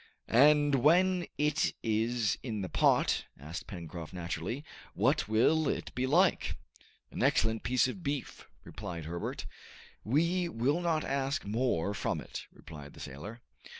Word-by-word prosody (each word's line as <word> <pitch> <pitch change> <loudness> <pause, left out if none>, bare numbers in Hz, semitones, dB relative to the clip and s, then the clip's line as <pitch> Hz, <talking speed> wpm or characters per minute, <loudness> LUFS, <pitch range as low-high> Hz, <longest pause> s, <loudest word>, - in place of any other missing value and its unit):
"And 145 +3 +5
when 180 +4 +4
it 150 +1 +1
is 115 0 +1
in 110 -5 -4
the 95 - -4
pot," - - +3
asked 75 +5 -7
Pencroft 85 -3 -7
naturally, 90 - -4 0.3
"what - - +2
will 135 +8 +3
it - - -3
be 130 +1 -1
like?" 175 +6 +3 0.5
"An - - -5
excellent 110 0 +2
piece 125 +1 +2
of 180 +8 -6
beef," 140 -3 -4 0.2
replied 90 -6 -7
Herbert. 85 +2 -4 0.6
"We 170 - +1
will 140 +6 0
not 165 -3 +1
ask 135 -1 -1
more 105 -4 0
from - - -2
it," - - -8
replied 75 -2 -11
the - - -14
sailor. 100 - -8
120 Hz, 140 wpm, -31 LUFS, 95-150 Hz, 0.6 s, And